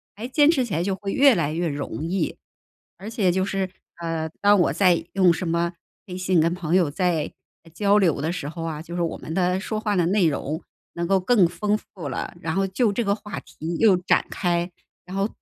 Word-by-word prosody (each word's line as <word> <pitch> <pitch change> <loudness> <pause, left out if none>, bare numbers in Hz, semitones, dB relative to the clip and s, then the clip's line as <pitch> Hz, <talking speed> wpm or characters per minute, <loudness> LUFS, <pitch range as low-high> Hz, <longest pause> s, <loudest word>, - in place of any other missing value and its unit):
还 220 +4 -6
坚 290 +3 +4
持 275 -6 +3
起 200 - -6
来 165 - +1
就 190 +1 -1
会 195 0 -5
越 275 -2 +5
来 155 -5 0
越 170 +2 -1
容 145 0 -4
易。 180 -1 -1 0.6
而 200 +4 -8
且 205 -6 +1
就 190 +1 +1
是， 195 -1 -2 0.3
呃， 165 -1 -2
当 205 0 +5
我 - - +3
在 180 -4 +3
用 185 -3 +5
什 175 - -4
么 170 +1 0 0.3
微 180 - -6
信 185 -2 +2
跟 165 +2 +2
朋 175 -1 -1
友 175 -6 +3
在 165 -1 0 0.4
交 205 +2 +3
流 165 -8 +2
的 160 - -1
时 165 -5 -4
候 165 +2 -6
啊， 160 -2 -4
就 170 +1 -8
是 175 - -1
我 170 - -2
们 160 - -7
的 180 +1 +1
说 215 +2 -3
话 210 -1 -1
的 175 -3 +2
内 190 -3 +3
容 150 +2 -2 0.3
能 170 0 -3
够 195 0 +3
更 190 -1 +4
丰 205 +5 -1 0.2
富 160 -7 -5
了， - - -4
然 160 - -2
后 195 - +2
就 205 +3 +1
这 235 - 0
个 200 -1 +1
话 210 -1 -7
题 165 +2 -6
又 215 -4 +6
展 180 - +2
开。 175 -1 -1 0.3
然 185 - -8
后 195 +1 +1
180 Hz, 245 characters per minute, -24 LUFS, 165-200 Hz, 0.6 s, 又